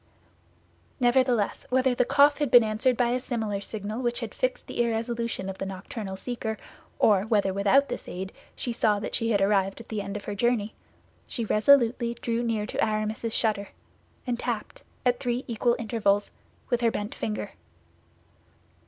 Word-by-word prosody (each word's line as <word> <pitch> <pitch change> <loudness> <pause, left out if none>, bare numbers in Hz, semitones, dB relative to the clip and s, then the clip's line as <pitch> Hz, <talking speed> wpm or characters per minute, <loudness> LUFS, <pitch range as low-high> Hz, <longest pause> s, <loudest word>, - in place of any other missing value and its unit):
Nevertheless, 245 -3 +2
whether 260 0 +3
the 245 - +2
cough 285 +3 +5
had 295 -3 +1
been 240 -1 +8
answered 225 +3 +1
by 245 -1 +2
a 250 - +1
similar 220 -6 -2
signal 215 +3 -5
which 240 -1 -1
had - - -5
fixed - - -1
the - - -2
irresolution 230 -3 -1
of 190 0 -6
the - - -2
nocturnal 195 +1 -6
seeker, 220 +1 -4 0.4
or 205 -3 +4
whether 205 -4 +2
without 205 +9 +4
this - - -5
aid 190 +2 -5 0.2
she 240 - -3
saw 215 -2 +2
that 205 - -5
she 230 -2 0
had 205 -3 +2
arrived 195 0 +2
at 230 - -12
the 215 -2 -2
end 200 +1 -5
of 205 - -9
her 205 - -3
journey, 220 0 0 0.5
she 235 - -3
resolutely 235 +1 +4
drew 235 0 -2
near 225 -3 -1
to - - -1
Aramis's 215 +1 -1
shutter, 210 -3 0 0.6
and 245 -2 -2
tapped, - - -4 0.2
at 245 -1 +3
three 245 0 -2
equal 235 0 +1
intervals, 210 -3 +1 0.4
with 240 0 +2
her 235 - +4
bent 210 -1 -4
finger. 215 -1 -4
230 Hz, 170 wpm, -27 LUFS, 210-245 Hz, 0.6 s, been